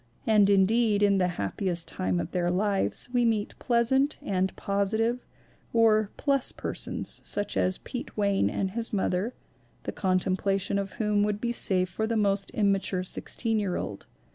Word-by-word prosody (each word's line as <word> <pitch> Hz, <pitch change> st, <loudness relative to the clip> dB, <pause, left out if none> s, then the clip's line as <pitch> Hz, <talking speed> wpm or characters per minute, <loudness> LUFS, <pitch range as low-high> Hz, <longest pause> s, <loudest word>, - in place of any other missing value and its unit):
And 210 Hz, -2 st, +4 dB
indeed 205 Hz, +2 st, +3 dB
in 200 Hz, -1 st, +4 dB
The 180 Hz, -, +3 dB
Happiest 170 Hz, -, -1 dB
Time 90 Hz, -1 st, -1 dB
of 85 Hz, -, -4 dB
Their 175 Hz, -1 st, 0 dB
Lives 195 Hz, +5 st, 0 dB
we 245 Hz, -1 st, +3 dB
meet 220 Hz, -3 st, 0 dB
pleasant 265 Hz, +4 st, +2 dB
and 190 Hz, -1 st, 0 dB
positive, 220 Hz, +5 st, -1 dB, 0.5 s
or 215 Hz, -2 st, +4 dB
"plus" 275 Hz, -3 st, +1 dB
per -, -, -5 dB
sons, -, -, -1 dB
such 205 Hz, -, -3 dB
as 185 Hz, 0 st, +1 dB
Pete 245 Hz, -, -7 dB
Wayne 200 Hz, -1 st, +2 dB
and 190 Hz, -1 st, -2 dB
his 230 Hz, +2 st, -2 dB
mother, 195 Hz, +2 st, -1 dB, 0.5 s
the -, -, -3 dB
con 185 Hz, -2 st, +1 dB
templation 195 Hz, +1 st, 0 dB
of 195 Hz, -1 st, -7 dB
whom 210 Hz, -2 st, +1 dB
would 205 Hz, 0 st, 0 dB
be 235 Hz, +1 st, -1 dB
safe 185 Hz, -5 st, +1 dB
for 220 Hz, +5 st, -3 dB
the 230 Hz, 0 st, 0 dB
most 200 Hz, -1 st, +1 dB
im 205 Hz, -2 st, +3 dB
mature 190 Hz, -1 st, -1 dB
sixteen 225 Hz, +4 st, -1 dB
year 195 Hz, -4 st, -1 dB
old. 100 Hz, -, -5 dB
200 Hz, 170 wpm, -27 LUFS, 190-225 Hz, 0.5 s, And